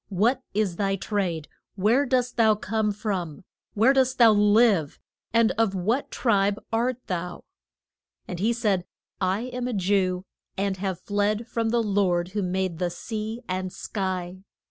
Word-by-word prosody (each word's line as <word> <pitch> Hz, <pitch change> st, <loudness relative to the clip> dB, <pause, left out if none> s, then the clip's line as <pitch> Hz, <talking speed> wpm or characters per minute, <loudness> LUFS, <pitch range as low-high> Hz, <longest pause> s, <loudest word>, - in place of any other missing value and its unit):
What 225 Hz, +7 st, +2 dB
is 200 Hz, -5 st, 0 dB
thy 195 Hz, -1 st, +1 dB
trade? 185 Hz, -6 st, -2 dB, 0.3 s
where 230 Hz, +8 st, +3 dB
dost 250 Hz, -1 st, +1 dB
thou 220 Hz, -2 st, +4 dB
come 210 Hz, +1 st, -1 dB
from? 185 Hz, -8 st, -4 dB, 0.3 s
where 230 Hz, +6 st, +5 dB
dost 260 Hz, -1 st, +2 dB
thou 230 Hz, -2 st, +7 dB
live? 205 Hz, -6 st, +4 dB, 0.3 s
and 230 Hz, 0 st, +4 dB
of 215 Hz, -4 st, +2 dB
what 220 Hz, +9 st, 0 dB
tribe 205 Hz, -4 st, +1 dB, 0.2 s
art 240 Hz, +2 st, +1 dB
thou? 180 Hz, -1 st, -4 dB, 0.8 s
And 180 Hz, -, -5 dB
he 220 Hz, +5 st, +2 dB
said 210 Hz, -6 st, 0 dB, 0.3 s
I 190 Hz, +2 st, 0 dB
am 250 Hz, 0 st, -4 dB
a 250 Hz, -, -2 dB
Jew, 185 Hz, -2 st, +1 dB, 0.3 s
and 195 Hz, 0 st, -1 dB
have 190 Hz, -2 st, -3 dB
fled 205 Hz, +2 st, 0 dB
from 230 Hz, -1 st, -1 dB
the 235 Hz, 0 st, +2 dB
Lord 185 Hz, -4 st, +1 dB
who 205 Hz, +2 st, -2 dB
made 185 Hz, -2 st, -2 dB
the 180 Hz, -1 st, 0 dB
sea 220 Hz, +5 st, -5 dB
and 185 Hz, 0 st, -3 dB
sky. 185 Hz, -2 st, -4 dB
205 Hz, 155 wpm, -25 LUFS, 185-225 Hz, 0.8 s, thou